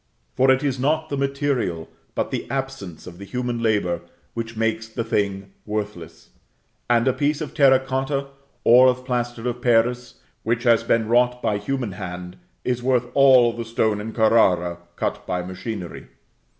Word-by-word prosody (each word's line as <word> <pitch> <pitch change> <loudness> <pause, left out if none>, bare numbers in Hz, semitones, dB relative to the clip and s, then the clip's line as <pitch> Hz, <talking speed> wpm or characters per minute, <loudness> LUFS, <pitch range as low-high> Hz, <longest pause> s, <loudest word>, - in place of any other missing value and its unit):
For 130 +1 +3
it 130 +1 +4
is 135 -3 -1
not 155 +4 0
the 140 - -2
material, 135 - -1 0.3
but - - -1
the - - -4
absence 130 - -5
of 85 0 -11
the - - -8
human 120 +3 -3
labor, 105 -6 +1 0.3
which 115 -1 -5
makes 110 0 -1
the 115 +1 -4
thing 100 -2 -2
worthless; 105 -6 -6 0.6
and 120 +1 +3
a 130 - +4
piece 145 +2 0
of 155 - -5
terra 135 -3 +5
cotta, 135 +1 -2 0.3
or 125 +2 +7
of 125 0 0
plaster 120 -2 -2
of 125 0 -3
Paris, 120 0 +1 0.3
which 115 +1 -1
has 120 -3 +4
been 115 -1 +1
wrought 125 +1 +3
by 105 -1 0
human 125 0 -3
hand, 90 -1 -7 0.3
is 125 -1 -1
worth 125 -1 +1
all 130 -4 +6
the 115 - -5
stone 110 -2 0
in 110 +2 -5
Carrara, 90 -7 +3 0.2
cut - - -3
by 90 -1 -2
machinery. 95 0 -6
120 Hz, 165 wpm, -23 LUFS, 105-130 Hz, 0.6 s, or